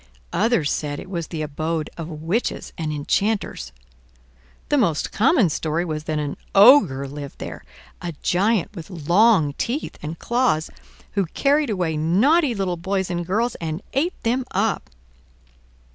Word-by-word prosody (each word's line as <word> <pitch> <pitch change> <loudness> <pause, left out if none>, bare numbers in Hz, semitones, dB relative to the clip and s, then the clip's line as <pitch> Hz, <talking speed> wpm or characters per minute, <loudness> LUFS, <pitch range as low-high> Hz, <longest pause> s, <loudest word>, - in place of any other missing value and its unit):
Others 200 -7 +2
said 145 -1 -2
it 190 - -10
was 170 -3 -3
the 160 -3 -4
abode 155 +1 -2
of 165 -1 -6
witches 165 +9 -2
and 155 -2 -3
enchanters. 150 - -1 1.0
The 295 - +3
most 170 - +1
common 245 - +4
story 160 +3 -1
was 155 -2 -4
that 155 -2 -1
an 145 -1 -3 0.2
Ogre 195 - +7
lived 140 0 -8
there, - - -7 0.4
a 175 -1 -4
giant 205 +2 +1
with 165 -2 -8
long 175 -1 +3
teeth 265 +6 -3
and 155 +2 -5
claws, 235 -10 +1 0.4
who 195 -4 0
carried 285 - +1
away 175 -6 -1
naughty 240 - +3
little 190 -3 -1
boys 190 +1 -2
and 175 0 -2
girls 225 +6 +1
and 160 +3 -4
ate 320 +7 0
them 245 +3 +1
up. 200 +3 -1
175 Hz, 145 wpm, -22 LUFS, 155-225 Hz, 1.0 s, Ogre